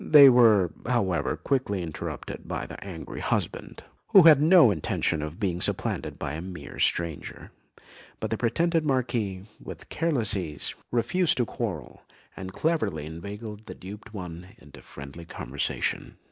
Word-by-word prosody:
They 140 Hz, -3 st, +9 dB
were, 110 Hz, -8 st, +5 dB, 0.2 s
however, 95 Hz, -, 0 dB
quickly 105 Hz, -9 st, -1 dB
interrupted 80 Hz, -3 st, -6 dB
by -, -, -3 dB
the -, -, -9 dB
angry 90 Hz, -5 st, -7 dB
husband, -, -, -3 dB, 0.2 s
who 195 Hz, -, +8 dB
had 155 Hz, -3 st, +8 dB
no 160 Hz, -, +7 dB
intention 80 Hz, -2 st, -1 dB
of 75 Hz, +5 st, -6 dB
being 90 Hz, -4 st, -1 dB
supplanted -, -, -1 dB
by 70 Hz, -, -4 dB
a 80 Hz, -, -4 dB
mere 90 Hz, -5 st, -8 dB
stranger; 85 Hz, -3 st, -1 dB, 0.7 s
but -, -, -4 dB
the -, -, 0 dB
pretended 165 Hz, +7 st, +1 dB
Marquis, 120 Hz, -9 st, -1 dB, 0.2 s
with -, -, -9 dB
careless 140 Hz, -11 st, 0 dB
ease, 80 Hz, -6 st, -4 dB, 0.2 s
refused 150 Hz, +9 st, +1 dB
to 120 Hz, -, +2 dB
quarrel, 95 Hz, -, -5 dB, 0.3 s
and 95 Hz, -1 st, -7 dB
cleverly 130 Hz, -, -1 dB
inveigled 105 Hz, +6 st, -8 dB
the -, -, -7 dB
duped 105 Hz, +3 st, -10 dB
one 90 Hz, 0 st, -8 dB
into 75 Hz, -1 st, -15 dB
friendly 70 Hz, +4 st, -10 dB
conversation. -, -, -3 dB
100 Hz, 145 wpm, -27 LUFS, 85-125 Hz, 0.7 s, They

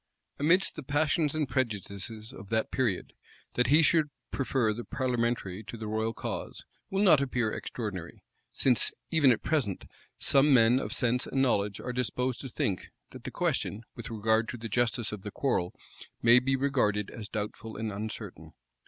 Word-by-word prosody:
Amidst 170 Hz, +6 st, +3 dB
the -, -, -6 dB
passions 150 Hz, +2 st, +1 dB
and 155 Hz, -2 st, 0 dB
prejudices 110 Hz, -3 st, -3 dB
of 100 Hz, -, -11 dB
that 110 Hz, -1 st, 0 dB
period, 115 Hz, -8 st, -1 dB, 0.4 s
that 125 Hz, -, +2 dB
he 150 Hz, +5 st, +6 dB
should 155 Hz, -1 st, +3 dB, 0.2 s
prefer 130 Hz, -5 st, +1 dB
the 120 Hz, +3 st, -6 dB
parliamentary 115 Hz, -7 st, -1 dB
to 115 Hz, -, -7 dB
the 110 Hz, -, -6 dB
royal 110 Hz, +1 st, -1 dB
cause, -, -, -5 dB, 0.2 s
will 195 Hz, +1 st, +1 dB
not 155 Hz, -8 st, +6 dB
appear 120 Hz, -5 st, 0 dB
extraordinary; 95 Hz, -8 st, -6 dB, 0.3 s
since, 125 Hz, -3 st, +3 dB, 0.2 s
even 155 Hz, -6 st, +5 dB
at 115 Hz, -, 0 dB
present, 125 Hz, -, 0 dB, 0.3 s
some 140 Hz, 0 st, +5 dB
men 120 Hz, +1 st, +5 dB
of -, -, -4 dB
sense 125 Hz, 0 st, +2 dB
and 135 Hz, -, -1 dB
knowledge 100 Hz, -5 st, +1 dB
are 125 Hz, -, -4 dB
disposed 125 Hz, 0 st, -1 dB
to 135 Hz, -, -6 dB
think, 100 Hz, -5 st, -2 dB, 0.2 s
that -, -, -12 dB
the -, -, -3 dB
question, 105 Hz, +3 st, -1 dB
with 120 Hz, -, -7 dB
regard 110 Hz, 0 st, +1 dB
to 125 Hz, -, -5 dB
the 115 Hz, -1 st, -6 dB
justice 120 Hz, 0 st, 0 dB
of 105 Hz, -2 st, -6 dB
the 105 Hz, -, -6 dB
quar* 135 Hz, +5 st, 0 dB
*rel, 90 Hz, 0 st, -3 dB, 0.5 s
may 120 Hz, +2 st, +7 dB
be 135 Hz, +2 st, +1 dB
regarded 125 Hz, -7 st, +1 dB
as 105 Hz, -2 st, -8 dB
doubtful 110 Hz, +1 st, -5 dB
and 110 Hz, 0 st, -3 dB
uncertain. 100 Hz, -6 st, -7 dB
120 Hz, 175 wpm, -29 LUFS, 105-135 Hz, 0.5 s, may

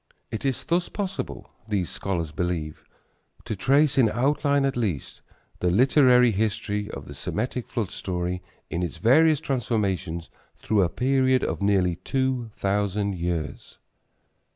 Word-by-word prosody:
It 110 Hz, -, -4 dB
is 135 Hz, -3 st, 0 dB
thus 175 Hz, +1 st, 0 dB
possible, 195 Hz, -2 st, -5 dB, 0.2 s
these 100 Hz, -5 st, -1 dB
scholars 90 Hz, -5 st, -2 dB
believe, 80 Hz, -2 st, -3 dB, 0.6 s
to 110 Hz, -, -3 dB
trace, 140 Hz, +8 st, +3 dB
in 115 Hz, -4 st, +5 dB
outline 140 Hz, +3 st, +2 dB
at 135 Hz, -, 0 dB
least, 100 Hz, -, -3 dB, 0.4 s
the 90 Hz, -, +1 dB
literary 125 Hz, -, +5 dB
history 105 Hz, 0 st, -1 dB
of -, -, -7 dB
the -, -, -9 dB
Semitic 120 Hz, +2 st, -3 dB
flood 115 Hz, -7 st, -3 dB
story 90 Hz, 0 st, -3 dB, 0.3 s
in 85 Hz, -, -1 dB
its 85 Hz, -4 st, -3 dB
various 155 Hz, +6 st, +5 dB
transformations 100 Hz, -, -2 dB, 0.3 s
through 105 Hz, -2 st, +1 dB
a 90 Hz, -, +2 dB
period 130 Hz, +2 st, +2 dB
of -, -, -2 dB
nearly 95 Hz, -4 st, +2 dB
two 130 Hz, -1 st, -1 dB
thousand 100 Hz, 0 st, 0 dB
years. 85 Hz, -3 st, -4 dB
110 Hz, 135 wpm, -25 LUFS, 90-130 Hz, 0.6 s, in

